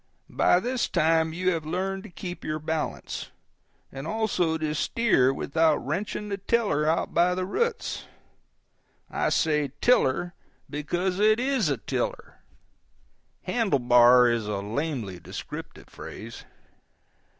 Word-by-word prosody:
By 180 - +4
this 245 +4 -1
time 160 -1 +2
you 185 +3 0
have 165 -3 -2
learned 190 +4 -2
to - - -9
keep 175 0 -7
your 155 0 -2
balance; 155 0 -4 0.6
and 135 +3 -7
also 185 -6 0
to 155 -1 -2
steer 155 - +2
without 155 +3 +2
wrenching 205 +7 -3
the 200 0 -3
tiller 200 -8 +1
out 160 - 0
by 180 +1 +3
the 185 0 -2
roots 470 - -2 1.1
(I - - 0
say 150 -4 +1
tiller 175 - +2 0.3
because 175 +6 -2
it 215 +2 +4
IS 255 - +1
a 140 - 0
tiller; - - -4 1.0
"handle 225 -11 +1
bar" 125 0 +6
is 115 -3 0
a 105 - -2
lamely 110 - -3
descriptive - - -8
phrase). 115 +3 -9
165 Hz, 130 wpm, -26 LUFS, 145-195 Hz, 1.1 s, bar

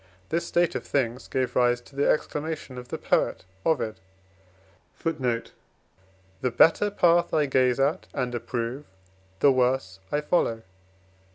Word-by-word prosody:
This 170 +1 -1
state 175 -1 +2
of - - -3
things 125 -2 -1
gave 130 -2 -1
rise 120 0 +3
to 135 - -19
the 140 - +2
exclamation 150 -4 -2
of 125 - -10
the - - -4
poet: - - 0 0.2
"The 95 - -4 1.0
better 205 - +5
path 175 -3 +3
I 150 -2 +3
gaze 130 -2 +2
at 145 +7 +1
and 125 -3 -2
approve, 120 +3 -3 0.6
The 140 - +7
worse 125 -7 +1
I 150 - +1
follow." 115 -8 0
130 Hz, 125 wpm, -26 LUFS, 115-150 Hz, 1.0 s, The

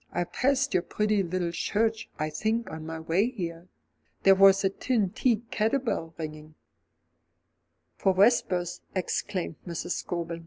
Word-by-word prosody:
I 175 - 0
passed 275 +6 0
your 180 - +3
pretty 210 +2 0
little 175 -1 -2
church, 220 +5 -1
I 155 0 -2
think, 220 +8 -1
on 160 0 -7
my 160 0 -5
way 170 +8 +1
here. 170 -7 -6 0.6
There 195 - +8
was 195 0 +6
a 195 - +3
tin 215 -3 0
tea 235 -1 +1
ket 220 +5 +1
a - - +2
bell 165 -10 -3
ringing 155 -1 -7 0.7
" - - -49
"For 195 - +3
vespers," 185 -4 +2
exclaimed 180 -2 -2
Mrs. 170 +1 -4
Scobel. 170 -2 -3
185 Hz, 155 wpm, -28 LUFS, 170-220 Hz, 0.7 s, There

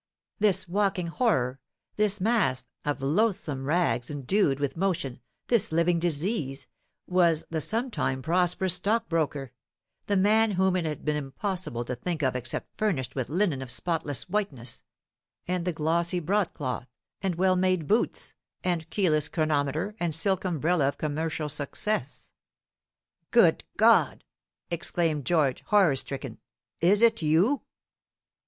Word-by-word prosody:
This 195 -3 +2
walking 195 -1 0
horror, 135 - 0 0.4
this 210 -1 +1
mass 185 - +1 0.2
of 145 -2 -2
loathsome 155 -4 0
rags 140 -7 +1
endued 145 +1 +1
with 140 -2 -2
motion, 165 -8 -2 0.3
this 235 -8 +1
living 170 +1 +2
disease, 160 - -1 0.4
was 170 -3 +2
the 160 -1 0
sometime 215 - -1
prosperous 180 +3 +1
stockbroker, 165 - -1 0.6
the 200 - +2
man 215 +2 +3
whom 190 0 +2
it 180 -2 0
had 150 -3 -4
been 150 -1 +1
impossible 145 - -3
to 125 - -3
think 160 +5 -3
of 130 -1 +1
except 125 -1 -4
furnished 175 - -1
with 130 -3 -3
linen 165 -4 0
of 130 - -7
spotless 150 -3 -2
whiteness, 145 - -3 0.7
and 180 -1 -1
the 180 - +1
glossy 170 +3 0
broad 190 +3 0
cloth, 130 -3 -4 0.3
and 190 -3 -1
well 185 +1 +3
made 185 -3 +1
boots, 215 +9 0 0.3
and 170 -3 -1
keyless 155 -7 +1
chronometer, 155 +4 -1
and 170 -3 +2
silk 190 +3 +3
umbrella 165 -3 +1
of 140 - -2
commercial 155 +1 -2
success. 145 - -2 1.0
"Good - - +4
God!" - - +4 0.5
exclaimed 165 -4 0
George, 150 -7 +2
horror 195 -9 +4
stricken, 135 +1 -3 0.4
"is 200 +6 +4
it 225 -3 +5
you?" 170 - +2
170 Hz, 135 wpm, -27 LUFS, 145-190 Hz, 1.0 s, it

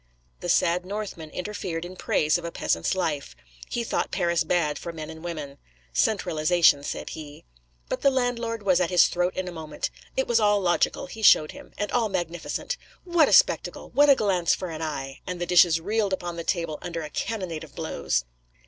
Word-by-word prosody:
The 175 - -5
sad 175 +1 +3
Northman 190 -5 -5
interfered 180 -2 -4
in 180 +1 -9
praise 155 -1 +1
of - - -10
a 170 - -4
peasant's 85 - 0
life; 150 - -2 0.3
he 240 - -2
thought - - -1
Paris 170 -3 +1
bad 155 -2 0
for 170 - -6
men 160 -1 -7
and 160 0 -11
women; 150 -5 -6 0.3
'centralisation,' 160 - +3
said - - -5
he— 150 -2 -9 0.4
But - - -3
the 275 - +5
landlord 240 -4 -1
was 185 -3 +3
at 175 - +1
his 180 -2 +6
throat 180 +1 0
in 185 0 -3
a - - -4
moment. 160 -3 -5 0.3
It 265 - +1
was 235 -1 +3
all 205 -1 +4
logical, 175 -3 +1
he 220 +5 -9
showed 155 -7 +6
him; - - -13
and 205 - -2
all 230 -3 +1
magnificent. 175 - -3 0.3
'What 345 -4 +3
a - - +1
spectacle! - - +3
What 290 +1 +5
a 280 - +8
glance 190 -7 +2
for 185 -3 -5
an 160 0 -6
eye!' 135 -4 -5
And 180 -1 -4
the 175 - -1
dishes 175 -1 +5
reeled 205 +2 0
upon 175 -2 -3
the 170 - -5
table 165 -3 -2
under 170 -2 -4
a 150 - -6
cannonade 185 -8 -3
of 155 - -13
blows. 70 - -1
175 Hz, 200 wpm, -26 LUFS, 160-205 Hz, 0.4 s, a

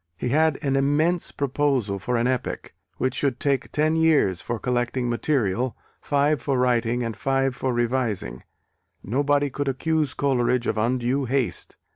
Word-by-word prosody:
He 125 - -2
had 155 +2 +3
an 135 -1 +1
immense 150 +6 +1
proposal 135 -7 0
for 125 +5 -1
an 115 - +1
epic, 130 -1 -2 0.2
which 130 -1 0
should 135 -3 -1
take 140 -2 0
ten 155 +1 +1
years 155 - +3
for 120 - -3
collecting 125 +1 -1
material, 120 -2 0 0.2
five 145 -1 +1
for 135 -1 0
writing 120 -1 +1
and 115 -2 -3
five 135 +3 0
for 130 0 -1
revising 120 - -1 0.6
nobody 145 +4 +1
could 145 +2 -3
accuse 150 +2 0
Coleridge 125 -3 +1
of - - 0
undue 125 +4 0
haste! 130 -1 -2
130 Hz, 150 wpm, -24 LUFS, 120-145 Hz, 0.6 s, had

